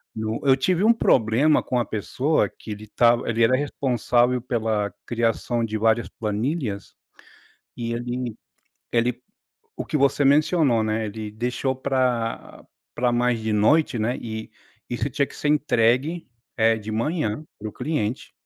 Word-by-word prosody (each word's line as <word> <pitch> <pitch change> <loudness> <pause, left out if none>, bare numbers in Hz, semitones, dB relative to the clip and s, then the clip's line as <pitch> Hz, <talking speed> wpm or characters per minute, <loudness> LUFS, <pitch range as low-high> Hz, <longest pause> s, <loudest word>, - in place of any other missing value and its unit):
no 110 +1 -3
eu 135 -1 +6
tive 180 +7 +1
um 225 - +6
problema 135 - +3
com 125 - -1
a 120 - 0
pessoa, 130 +8 0
que 110 - -11
ele 105 0 -7
estava 120 +2 +2
ele 115 0 +2
era 130 +3 +4
responsável 125 -3 +1
pela 110 -5 -1
criação 120 0 -1
de 110 -1 -3
várias 110 +1 +2
planilhas, 110 0 -3 0.8
e 115 -1 -3
ele 120 -1 -4 0.6
ele, 120 +1 +1 0.5
o - - -4
que - - -2
você 140 0 +2
mencionou, 145 -4 +3
né, 110 +1 -1
ele 105 0 -6
deixou 125 +4 -2
pra 130 -3 -2 0.3
pra 125 0 +1
mais 120 0 +1
de 110 0 -2
noite, 120 +6 +3
né, 115 +3 0
e 110 -1 -6 0.4
isso 125 +3 -2
tinha 140 +2 0
que - - -15
ser 150 - -2
entregue, 145 +2 +2 0.3
eh, 115 -1 +3
de 110 0 -7
manhã, 145 +1 -1
para 110 - -5
o - - -10
cliente 130 -7 -3
120 Hz, 155 wpm, -23 LUFS, 110-135 Hz, 0.8 s, eu